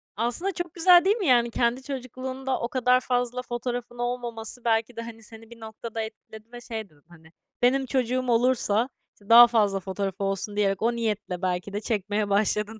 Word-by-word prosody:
Aslında 240 - -1
çok 350 -3 -5
güzel, 350 +1 +6
değil 400 +2 +4
mi? 405 - -2
Yani, 240 -2 +4
kendi 240 +3 0
çocukluğunda 260 0 -4
o 235 - -2
kadar 250 0 +2
fazla 245 0 -1
fotoğrafın 240 0 -5
olmaması 240 -1 -5
belki 225 +1 +1
de, 230 - -5
hani, 230 -1 -10
seni 225 +1 -13
bir 235 - -13
noktada 225 0 -6
etkiledi 220 0 -10
ve 240 - -8
şey 220 -4 -6
dedin, 145 -2 -26
hani, 165 -2 -18 0.3
"Benim 265 +2 +3
çocuğum 255 0 0
olursa, 235 -1 +2 0.2
işte, 205 - -22
daha 240 +1 +10
fazla 210 -4 +2
fotoğrafı 195 +1 -4
olsun." 195 +1 -2
diyerek, 200 -1 +1
o 235 +1 +1
niyetle 210 -5 -3
belki 185 +1 -2
de 205 - -3
çekmeye 205 -1 -1
başladın 210 +2 0
230 Hz, 185 wpm, -26 LUFS, 210-250 Hz, 0.3 s, daha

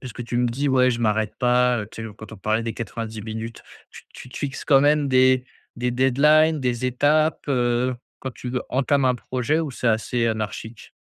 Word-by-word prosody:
puisque 120 -2 -7
tu 120 0 -2
me 125 - +2
dis: 135 +5 -1
«Ouais 130 -1 +4
je 120 -1 -3
m'arrête 110 -1 0
pas», 125 0 +3
heu, 105 - -7
tu 115 - -7
sais 110 - -5
quand 110 - -11
on 110 - -9
parlait 110 +4 -1
des 115 - -3
90 110 -1 -6
minutes. 110 +1 -6 0.3
Tu - - -13
tu - - -11
te - - -8
fixes 140 -2 -4
quand 135 -3 +5
même 145 +1 +3
des 130 -1 +4 0.3
des 125 +1 -1
deadlines, 150 +5 +3
des 125 -1 -1
étapes, 150 +5 +1
heu, 125 -1 +1 0.3
quand 130 - -5
tu 125 - -7 0.2
entames 140 +1 +1
un 130 -1 +3
projet, 130 +5 -1
ou 155 -3 -3
c'est 125 -1 -4
assez 115 +2 0
anarchique? 110 0 -5
125 Hz, 205 wpm, -23 LUFS, 115-135 Hz, 0.3 s, quand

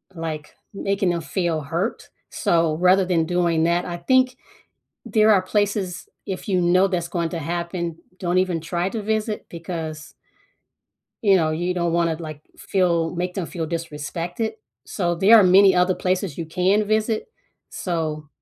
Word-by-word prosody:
like, 160 -2 -6 0.2
making 195 -1 0
them 170 -1 -2
feel 165 +1 -1
hurt, 170 - -3 0.2
so 165 -2 +1
rather 185 +2 +4
than 170 -3 +1
doing 170 -1 +1
that, 170 +1 +2
I 175 -1 -4
think 255 +7 +2 0.7
there 215 -1 +4
are 200 -3 +6
places, 200 -2 -1 0.2
if 190 +1 -5
you 185 -2 +2
know 180 +2 +4
that's 175 -3 -2
going 170 -1 -1
to 170 - -4
happen, 170 +1 -3 0.2
don't 180 0 0
even 180 -3 +1
try 175 +2 -2
to 225 - -3
visit 215 0 -2
because 165 -2 -6 1.1
you 200 -3 +5
know, 160 -3 +2
you 175 +3 -1
don't 170 -1 0
wanna, 170 -1 +1
like, 155 -2 -8
feel 170 -3 0
make 180 +1 -2
them 185 -4 -3
feel 165 -1 -4
disrespected. 165 +5 -4 0.3
So, 175 -4 -1
there 200 +6 +7
are 210 - +7
many 190 +1 +6
other 180 +1 +3
places 185 -4 -2
you 165 - -3
can 190 +5 +2
visit. 215 +1 0 0.4
So, 155 -4 -3
175 Hz, 160 wpm, -22 LUFS, 165-190 Hz, 1.1 s, there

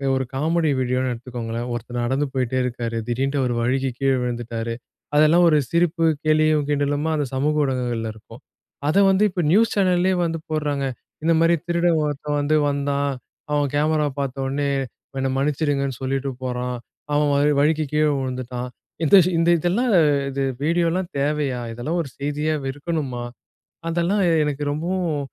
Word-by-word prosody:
1 130 0 -1
comedy 160 +2 +1
வீடியோன்னு 125 0 0
எடுத்துக்கோங்களேன். 120 -1 -5
ஒருத்தர் 120 +1 -4
நடந்து 135 +4 0
போயிட்டே 130 -1 -1
இருக்காரு. 120 -2 -3
திடீர்ன்ட்டு 135 +4 0
அவரு 125 -2 0
வழுக்கி 130 +3 0
கீழ 135 0 +2
விழுந்துட்டாரு. 115 -1 -3 0.4
அதெல்லாம் 155 +4 +5
ஒரு 155 - +4
சிரிப்பு, 170 0 +2 0.2
கேலியும், 155 -1 +3
கிண்டலுமா 145 +2 0
அந்த 145 -2 0
சமூக 150 +3 +1
ஊடகங்கள்ல 120 -4 -2
இருக்கும். 110 - -15 0.5
அத 155 - +2
வந்து 195 +2 +3
இப்ப 185 -1 -2
நியூஸ் 225 +5 +4
சேனல்லயே 185 -1 +2
வந்து 165 -1 -1
போடுறாங்க. 145 -3 -1 0.4
இந்த 165 +1 +3
மாரி 165 +1 +4
திருடன் 170 -1 +2
ஒருத்தன் 145 0 -2
வந்து 145 +2 +1
வந்தான், 140 0 0 0.4
அவன் 145 -2 +1
கேமரா 150 0 +2
பார்த்த 135 -1 -2
ஒன்னே, 140 +1 -1 0.5
என்னை 135 0 0
மன்னிச்சிருங்கன்னு 140 -2 0
சொல்லிட்டு 135 +1 -1
போறான். 125 0 -2 0.4
அவன் 145 0 +3
வ - - +3 0.2
வழிக்கி 155 +1 +2
கீழ 155 0 +3
வுழுந்துட்டான். 125 -1 -4 0.4
இந்த 160 - +6 0.2
இந்த 165 +1 +3
இதெல்லாம் 215 +9 +1 0.4
இது 140 - -3 0.2
வீடியோலாம் 170 +3 +1
தேவையா? 140 -3 0
இதெல்லாம் 155 +9 -2
ஒரு 140 - -9
செய்தியா 150 +2 -1
வ் 135 - -2
இருக்கணுமா? 145 -5 -3 0.7
அதெல்லாம் 175 +4 +1 0.2
எனக்கு 145 -1 -2
ரொம்பவும் 170 -1 -1
145 Hz, 145 wpm, -22 LUFS, 130-160 Hz, 0.7 s, இந்த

